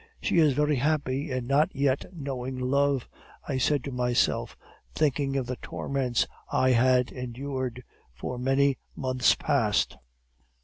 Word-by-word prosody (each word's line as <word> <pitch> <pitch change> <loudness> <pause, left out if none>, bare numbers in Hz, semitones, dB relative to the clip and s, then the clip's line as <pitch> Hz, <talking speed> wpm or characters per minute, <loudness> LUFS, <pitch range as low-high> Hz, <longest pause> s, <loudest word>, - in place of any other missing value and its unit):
"'She - - +1
is 155 -4 +5
very 150 +1 +2
happy 145 +1 0
in 130 -2 -2
not 140 +4 +3
yet 140 -1 +1
knowing 135 -6 -5
love,' 140 +1 +1 0.4
I 135 -3 -1
said 140 +1 +2
to 140 - -5
myself, 125 -1 0 0.4
thinking 140 -2 +1
of 130 - -1
the 125 0 -4
torments 130 -3 -1 0.3
I 130 - +3
had 125 +1 +3
endured 125 0 -4 0.3
for 95 - -6
many 135 +1 +2 0.2
months 130 -1 +2
past. 115 -8 +1
130 Hz, 135 wpm, -27 LUFS, 125-140 Hz, 0.4 s, is